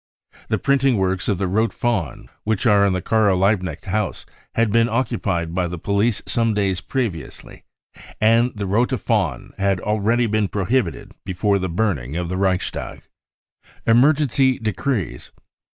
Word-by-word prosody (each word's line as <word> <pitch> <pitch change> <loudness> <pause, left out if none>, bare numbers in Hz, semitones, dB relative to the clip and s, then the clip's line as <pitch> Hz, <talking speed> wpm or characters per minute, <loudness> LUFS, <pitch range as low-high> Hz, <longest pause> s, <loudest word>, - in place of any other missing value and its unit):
The - - 0
printing 135 -3 +2
works 95 0 -1
of 100 - +1
the 100 - -1
Rote 110 +5 +1
Fahne 95 - -2 0.2
which 110 +1 -1
are 100 -3 +5
in 95 - +1
the 90 -2 -2
Karl 110 -4 +2
Liehknecht 95 -5 0
house 105 +2 -2 0.3
had 115 -2 +2
been 115 +2 +3
occupied 100 -8 -1
by 90 0 0
the 90 +1 -5
police 100 +5 0
some 115 -2 0
days 95 -3 0
previously, 110 - -5 0.5
and 115 +3 +4
the 105 -1 -3
Rote 120 +7 +1
Fahne 95 - -1
had 95 -1 +1
already 110 +5 +1
been 110 -2 +1
prohibited 100 0 -1
before 100 +1 0
the 95 0 -2
burning 85 - -1
of 85 0 -2
the 90 - -2
Reichstag. 95 -1 -2 0.8
Emergency 135 +1 +3
Decrees. 110 - -3
105 Hz, 150 wpm, -21 LUFS, 95-115 Hz, 0.8 s, are